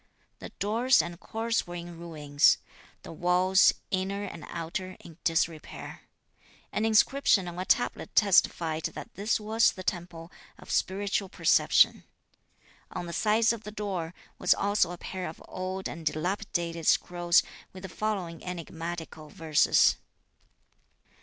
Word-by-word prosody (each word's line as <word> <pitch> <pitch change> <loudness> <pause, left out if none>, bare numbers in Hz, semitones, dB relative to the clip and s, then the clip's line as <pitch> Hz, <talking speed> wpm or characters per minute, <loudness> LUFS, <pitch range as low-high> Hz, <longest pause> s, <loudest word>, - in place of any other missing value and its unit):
The - - -8
doors 230 +4 +3
and 170 +2 -2
courts 225 0 -2
were 175 - -7
in 175 0 -7
ruins. 150 -4 +2 0.5
The - - -9
walls, 180 +3 +4 0.2
inner 195 +1 -1
and 180 -5 -7
outer, 185 +3 -5
in 165 0 -14
disrepair. 165 -1 -2 0.7
An 215 - -1
inscription 220 -3 +3
on 175 0 -6
a 185 - -3
tablet 245 - 0
testified 165 -5 +3
that - - -9
this 210 +4 0
was 220 +1 +3
the 185 - -8
temple 175 -1 -4 0.3
of - - -11
Spiritual 195 0 0
Perception. - - +3 0.9
On 180 - -5
the 170 - -6
sides 220 +3 +3
of 230 - -7
the 210 - -7
door 190 -5 -4 0.2
was - - +4
also 200 -3 +1
a 175 - -6
pair 185 +1 -5
of 160 - -11
old 185 +1 -4
and 165 +2 -8
dilapidated 170 0 -2
scrolls 175 -1 +3 0.3
with 185 0 -11
the - - -5
following 185 -4 -3
enigmatical 165 -2 -6
verses. 155 -2 +3
180 Hz, 135 wpm, -28 LUFS, 170-205 Hz, 0.9 s, walls